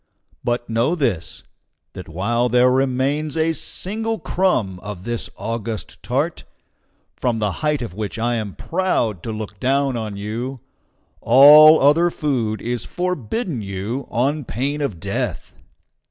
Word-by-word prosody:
But 120 0 -1
know 115 +9 +1
this, 115 - -2 0.5
that - - -9
while 115 +9 0
there 125 +1 +4
remains 135 +4 0
a 160 +1 +2
single 220 +7 -3
crumb 135 - 0
of 105 -2 -8
this 120 +1 -3
august 115 -1 -5
tart, 140 +8 -2 0.7
from 120 -2 -1
the 105 -2 0
height 150 -4 0
of 100 - -6
which 105 +2 -4
I 120 +2 0
am 110 -4 -3
proud 160 - -1
to 115 - -5
look 105 -2 -6
down 135 +1 +1
on 110 -3 -4
you, 115 +6 -4 0.6
all 150 +5 +9
other 155 +5 +4
food 120 - -2
is 120 -1 -2
forbidden 180 - -3
you 100 +7 -4
on 140 +5 0
pain 140 +5 -3
of 110 - -2
death. 100 0 -4
125 Hz, 140 wpm, -21 LUFS, 110-150 Hz, 0.7 s, all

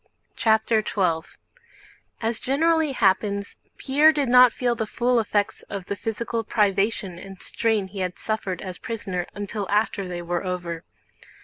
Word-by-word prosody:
CHAPTER 220 0 +2
XII 170 -6 0 0.9
As 225 0 -1
generally 320 +2 +2
happens, 200 -2 +1 0.2
Pierre 295 +4 +5
did 290 -5 0
not 250 0 +8
feel 245 0 0
the 225 -2 -3
full 245 +2 +1
effects 205 -2 0
of 200 -2 -5
the 200 - -3
physical 225 +3 -3
privation 200 -3 0
and 195 0 -10
strain 220 -4 0
he 195 +1 -8
had 180 -1 -2
suffered 200 -5 -3
as 185 -2 -7
prisoner 195 -6 -4
until 205 -1 -4
after 205 -2 +1
they 175 -1 -5
were 175 0 -2
over. 175 -3 -4
210 Hz, 145 wpm, -24 LUFS, 190-230 Hz, 0.9 s, not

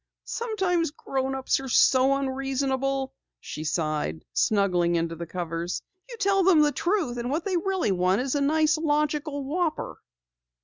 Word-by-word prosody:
"Sometimes 380 -8 -1
grownups 265 -3 -2
are 270 -1 -6
so 260 +2 +4
unreasonable," 270 0 -1 0.3
she 155 - -7
sighed, 155 - -2
snuggling 180 -5 +2
into 165 0 -1
the 170 +1 -7
covers. 170 0 -4 0.3
"You 475 - -8
tell 395 -2 +2
them 350 -4 +5
the 295 - +3
truth 340 -8 -1
and 240 +1 -3
what 310 +5 -2
they 385 -2 0
really 375 - 0
want 185 +1 +2
is 260 +1 -1
a 285 - 0
nice 310 +2 +2
logical 300 -1 0
whopper!" 315 +3 -2
270 Hz, 145 wpm, -26 LUFS, 200-315 Hz, 0.3 s, them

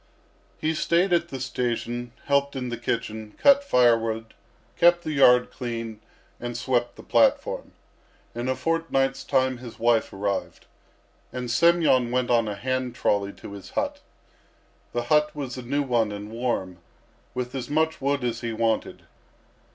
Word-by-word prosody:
He 155 +1 0
stayed 170 +3 +2
at 170 0 +2
the 135 - -5
station, 120 -1 -3
helped 140 0 +1
in 125 -2 -3
the 120 - -4
kitchen, 110 -2 -4
cut 280 0 +6
firewood, 115 - +2 0.4
kept 175 0 +4
the 155 - -3
yard 125 -4 +5
clean, 115 -3 -5 0.4
and 120 -1 -4
swept 120 -1 0
the - - -12
platform. - - +1 0.6
In 120 +2 -3
a 130 - +1
fortnight's 165 -5 0
time 130 -1 +1
his 120 -2 -10
wife 115 -1 +2
arrived, 100 0 -3 0.7
and 125 -1 -4
Semyon 165 -5 +4
went 125 0 0
on 115 -2 +3
a 105 - -3
hand 130 +2 -2
trolley 100 -4 +1
to - - -11
his 100 -1 -9
hut. - - -2 0.9
The 120 - -1
hut 150 +4 +2
was 135 -4 -5
a 130 - -6
new 140 +4 -1
one 120 -5 +1
and 105 +1 -7
warm, 115 -7 -2 0.6
with 125 0 -3
as 130 -2 -4
much 160 +1 0
wood 140 0 0
as 120 -1 -2
he 115 -2 -3
wanted. 115 0 -1
125 Hz, 155 wpm, -25 LUFS, 115-140 Hz, 0.9 s, cut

